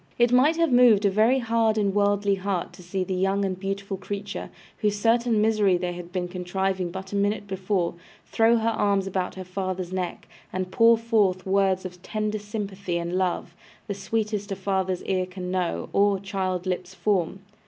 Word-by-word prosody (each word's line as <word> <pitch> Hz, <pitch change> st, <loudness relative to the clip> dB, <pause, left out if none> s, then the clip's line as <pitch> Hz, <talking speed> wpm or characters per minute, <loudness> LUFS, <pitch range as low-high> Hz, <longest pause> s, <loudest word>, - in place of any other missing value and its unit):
It 240 Hz, 0 st, +4 dB
might 270 Hz, +6 st, +5 dB
have 335 Hz, -3 st, +2 dB
moved 240 Hz, -4 st, +6 dB
a 200 Hz, -, +4 dB
very 220 Hz, +6 st, +4 dB
hard 225 Hz, -2 st, +1 dB
and 200 Hz, -2 st, +1 dB
worldly 205 Hz, 0 st, +2 dB
heart 190 Hz, -2 st, -2 dB
to -, -, -13 dB
see 185 Hz, +2 st, -2 dB
the 185 Hz, -, -3 dB
young 195 Hz, +2 st, +1 dB
and 185 Hz, -1 st, -3 dB
beautiful 195 Hz, 0 st, -3 dB
creature, 200 Hz, +1 st, -5 dB, 0.3 s
whose 210 Hz, -2 st, 0 dB
certain 230 Hz, +1 st, +2 dB
misery 210 Hz, -4 st, +3 dB
they 175 Hz, 0 st, -3 dB
had 175 Hz, 0 st, -9 dB
been 180 Hz, -1 st, -2 dB
contriving 185 Hz, 0 st, -2 dB
but 190 Hz, +2 st, -7 dB
a -, -, -1 dB
minute 205 Hz, +1 st, 0 dB
before, 190 Hz, -2 st, -1 dB, 0.3 s
throw 230 Hz, +1 st, +3 dB
her 225 Hz, 0 st, +1 dB
arms 200 Hz, -3 st, +1 dB
about 185 Hz, -1 st, -2 dB
her 190 Hz, -, -6 dB
father's 185 Hz, -1 st, -4 dB
neck, 180 Hz, -2 st, -4 dB, 0.2 s
and 185 Hz, 0 st, -3 dB
pour 230 Hz, +2 st, +6 dB
forth 215 Hz, -5 st, +1 dB
words 190 Hz, -1 st, +2 dB
of 180 Hz, -1 st, -8 dB
tender 215 Hz, +1 st, -2 dB
sympathy 200 Hz, -4 st, -4 dB
and 170 Hz, +1 st, -3 dB
love, 180 Hz, -2 st, -1 dB, 0.3 s
the 200 Hz, -, -3 dB
sweetest 205 Hz, +1 st, -2 dB
a -, -, -1 dB
father's 190 Hz, -1 st, -1 dB
ear 185 Hz, -1 st, 0 dB
can 180 Hz, -1 st, -6 dB
know, 180 Hz, -2 st, -1 dB
or 200 Hz, -1 st, +3 dB
child's 185 Hz, -2 st, -2 dB
lips 185 Hz, 0 st, -3 dB
form. 190 Hz, -2 st, 0 dB
195 Hz, 185 wpm, -25 LUFS, 185-210 Hz, 0.3 s, moved